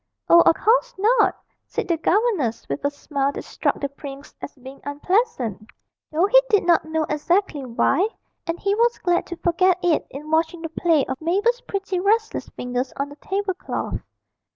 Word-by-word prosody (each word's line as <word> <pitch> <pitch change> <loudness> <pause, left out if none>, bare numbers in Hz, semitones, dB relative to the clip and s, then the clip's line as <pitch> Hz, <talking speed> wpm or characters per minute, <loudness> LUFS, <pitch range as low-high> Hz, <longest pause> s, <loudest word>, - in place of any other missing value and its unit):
'Oh, 340 - +8
of - - +6
course - - +2
not,' 445 +6 +3 0.3
said - - -3
the 340 - +2
governess, 340 - 0
with 140 - -4
a 285 - +2
smile 280 -1 -2
that - - -6
struck - - -1
the 280 - -1
prince 280 0 -10
as - - -7
being 265 0 -12
unpleasant 285 - -1 0.4
though 325 +4 +3
he - - +6
did 415 -5 +3
not 340 -2 +4
know 315 0 -1
exactly 300 0 0
why, 330 - +2 0.4
and 330 +1 -2
he 400 0 +1
was 470 +2 +2
glad 350 -1 0
to 345 - -5
forget 360 +1 +2
it 345 -3 +2
in 300 +3 -8
watching 325 +1 +1
the 325 - -3
play 325 -2 +2
of 265 +2 -5
Mabel's 410 +9 +1
pretty 390 -4 -3
restless 440 +4 0
fingers 250 +1 -3
on 280 +1 -2
the 285 - -11
table 390 +4 -2
cloth. 365 - -4
340 Hz, 180 wpm, -23 LUFS, 285-400 Hz, 0.4 s, Oh